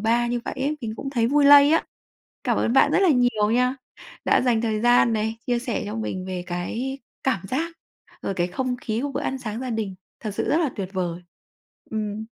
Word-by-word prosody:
ba 235 +2 +2
như 240 0 -1
vậy - - -4
ấy, 285 +3 -1
mình 225 -3 -4
cũng 275 - -5
thấy 235 -4 +1
vui 285 +3 +3
lây 285 +1 +8
á. 325 - +3 0.6
Cảm - - +1
ơn 230 - +1
bạn 270 - +5
rất - - +4
là 385 - +5
nhiều 245 -6 +2
nha, 250 +3 +2 0.5
đã - - +4
dành 240 -3 +2
thời 220 -2 -1
gian 240 0 +4
này, 220 +1 -1
chia 245 -1 +1
sẻ 240 -1 -3
cho 210 - -5
mình 185 -4 -3
về 185 -1 -4
cái 225 +10 -3 0.3
cảm 265 -8 +1
giác, 325 +6 -2 0.5
rồi 195 - -2
cái 175 -1 0
không 250 +7 -2
khí 225 -2 -3
của 285 -1 -3
bữa - - -2
ăn 265 - -2
sáng 225 -3 -5
gia 255 -1 -4
đình, 215 -4 -2 0.3
thật 215 - -4
sự - - -1
rất 310 - +3
là 315 -6 +1
tuyệt 195 -2 -3
vời. 180 -2 -3 0.7
Ừm. 215 -1 -3
235 Hz, 230 wpm, -24 LUFS, 215-265 Hz, 0.7 s, lây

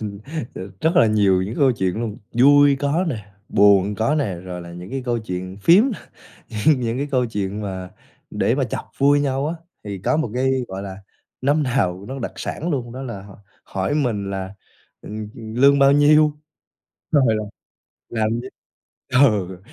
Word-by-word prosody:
Ừ, 100 -2 -5 0.4
r - - -8 0.2
rất 165 +2 +1
là 115 - +6
nhiều 100 -4 +3
những 105 +5 -4
câu 135 -3 +4
chuyện 95 -5 -1
luôn, 115 -2 -4
vui 140 +3 +6
có 145 +6 0
nè, 105 -7 -5 0.2
buồn 100 0 +4
có 115 +8 +1
nè, 125 -12 -1
rồi 90 0 -7
là 85 0 -10
những 90 +2 -9
cái 135 -1 -3
câu 120 -1 0
chuyện 95 -2 -6
phiếm 175 - +6
nè, - - -6 0.7
những 150 -4 +5
những 115 0 -2
cái 145 +1 -2
câu 125 -2 +2
chuyện 105 -2 -3
mà 95 -2 -5 0.4
để - - +1
mà - - +1
chọc - - -4
vui 145 +1 +4
nhau 140 0 0
á, 165 - -3 0.3
thì 100 -2 -5
có 155 - +2
một 155 -8 -1
cái, 130 +1 +1 0.2
gọi 95 +1 -6
là, 95 -1 -7 0.4
năm 145 +3 +2
nào 100 -8 -1
nó 135 +1 -6
đặc - - -4
sản 170 +3 -4
luôn, 125 -6 -2
đó 130 +2 -7
là 115 -7 -6
hỏi 100 -1 -14 0.3
hỏi 95 +8 -2
mình 110 -9 -1
là, 95 0 -5 0.5
ừm, 105 0 -7
ừm, 110 -2 -8
"lương 140 +2 +5
bao 140 0 +6
nhiêu?" 150 +1 +4 0.7
rồi 140 -3 +5
là 110 - -3 0.7
"làm 110 -2 0
gì?" 130 - -8 0.6
Ừ, 105 -9 +2
115 Hz, 190 wpm, -21 LUFS, 100-140 Hz, 0.7 s, là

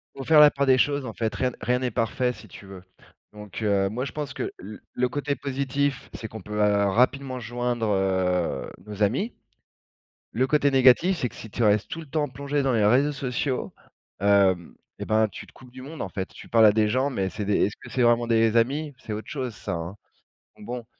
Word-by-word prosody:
Faut 135 - -6
faire 155 +2 +5
la 150 0 +9
part 140 -1 -1
des 130 -1 +5
choses, 140 +1 +1
en 115 - -6
fait, 110 -1 -2
rien 130 - 0
n - - -12
rien 125 0 0
n'est 125 -1 -2
parfait, 120 +3 0
si - - -13
tu - - -13
veux. 95 -2 -11 0.5
Donc 105 +1 -9
heu, 100 -2 +2
moi 125 +6 -3
je - - -7
pense 150 -2 -5
que - - -3
l 105 +3 -9
le 125 0 0
côté 145 +2 -2
positif, 140 0 -2
c'est 110 - -7
qu'on 110 - -9
peut, 105 +3 -9
heu, 105 -1 +2
rapidement 130 +4 +1
joindre, 120 -1 -2
heu, 95 -5 0
nos 105 0 -3
amis. 135 - 0 1.0
Le 130 - +1
côté 145 0 +2
négatif, 135 +8 +5
c'est 125 - -1
que - - -18
si 110 - -10
tu 115 - -1
restes 105 -1 +2
tout - - -5
le 160 - -11
temps 150 +1 -1
plongé 140 +2 -2
dans 135 -1 +1
les 110 -3 +2
réseaux 130 +7 +4
sociaux, 135 -1 -3 0.5
hem 100 -3 +2 0.2
et - - -3
ben 110 0 +3
tu - - -10
te - - -18
coupes 125 -2 -16
du 130 0 -10
monde, 155 +4 -7
en 100 - -4
fait. 95 +1 -4
Tu - - -13
parles 115 -1 +6
à 105 - +6
des 105 0 +2
gens 130 +6 +1
mais 95 -7 -2
c'est 105 +1 -5
des, 100 0 +2
est-ce 105 - -5
que - - -11
c'est 130 - 0
vraiment 120 0 +3
des 115 -1 +3
amis, 145 +6 +1
c'est 115 - -8
autre 105 +1 -6
chose 130 -5 -4
ça, - - -5
hein. 85 +3 -5 0.6
Donc 105 - -13
bon 120 0 -6
120 Hz, 235 wpm, -25 LUFS, 105-135 Hz, 1.0 s, la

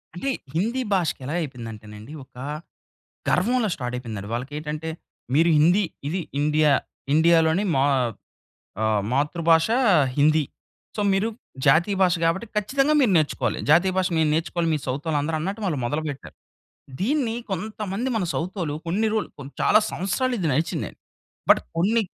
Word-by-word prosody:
అంటే 270 +10 -2 0.2
హిందీ 230 +10 0
భాషకి 170 -7 0
ఎలా 150 +6 -3
అయిపోయిందంటేనండి 110 -3 -8
ఒకా 125 0 -11 0.9
గర్వంలా 225 +4 +2
స్టార్ట్ 125 -2 -5
అయిపోయిందండి. 110 -5 -6
వాళ్ళకి 125 +4 -4
ఏటంటే 155 +1 -5 0.5
మీరు 165 +3 +4
హిందీ, 175 +7 +4 0.2
ఇది 180 +4 -1 0.2
ఇండియా. 150 0 +3 0.4
ఇండియాలోని 165 +3 +4
మా 135 - +3 1.0
ఆహ్, 110 -1 +2
మాతృభాషా 165 - +2 0.4
హిందీ. 155 +1 +4 0.5
సో 210 - -1
మీరు 200 +4 +1 0.4
జాతీయ 170 +8 +4
భాష 180 -2 +5
గాబట్టి 170 +7 +1
ఖచ్చితంగా 270 +8 +2
మీరు 240 -7 +3
నేర్చుకోవాలి. 155 -2 0
జాతీయ 175 +5 +5
భాష 185 -1 +2
మీరు 155 -1 +3
నేర్చుకోవాలి, 165 +1 0
మీ - - +1
సౌతోళ్ళు 145 +4 -1
అందరూ 160 +2 -2
అన్నట్టు 195 +7 -4
వాళ్ళు 155 -8 -1
మొదలుపెట్టారు. 150 +1 -4 0.7
దీన్ని 245 +1 0 0.2
కొంతమంది 210 +4 -3
మన 195 - 0
సౌతోళ్ళు 170 -3 -3
కొన్ని 205 +6 +1
రోల్ 220 - -1
కొన్ 140 -1 -8
చాలా 210 - +6
సంవత్సరాలు 245 +7 -1
ఇది 170 -5 0
నడిచిందండి. 155 +5 -2 0.5
బట్ - - +7 0.2
కొన్ని 215 +7 +2
165 Hz, 140 wpm, -24 LUFS, 150-200 Hz, 1.0 s, బట్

